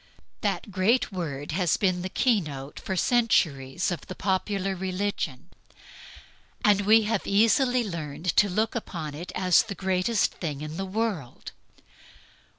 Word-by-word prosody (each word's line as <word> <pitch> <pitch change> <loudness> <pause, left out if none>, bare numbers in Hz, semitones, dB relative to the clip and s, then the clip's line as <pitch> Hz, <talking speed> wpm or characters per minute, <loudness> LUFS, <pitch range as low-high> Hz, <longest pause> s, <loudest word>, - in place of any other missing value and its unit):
That 210 - -2
great 205 +8 +2
word 150 -6 -4
has 175 0 +1
been 185 -3 +1
the 185 - -4
key 230 0 +2
note 140 -3 -7
for 190 - -4
centuries 170 - +1
of 170 -5 -5
the 185 - -7
popular 195 0 -1
religion; 185 -7 -3 1.2
and 205 -1 +5
we 220 +1 +7
have 215 -1 -1
easily 235 +4 +3
learned 165 -1 -3
to 205 - +5
look 215 +5 0
upon 165 -10 -5
it 165 +5 -7
as 185 -2 +4
the 220 -3 -6
greatest 190 +4 +1
thing 150 -5 -5
in 155 +1 -6
the 195 - -3
world. 195 - -3
185 Hz, 145 wpm, -26 LUFS, 165-210 Hz, 1.2 s, we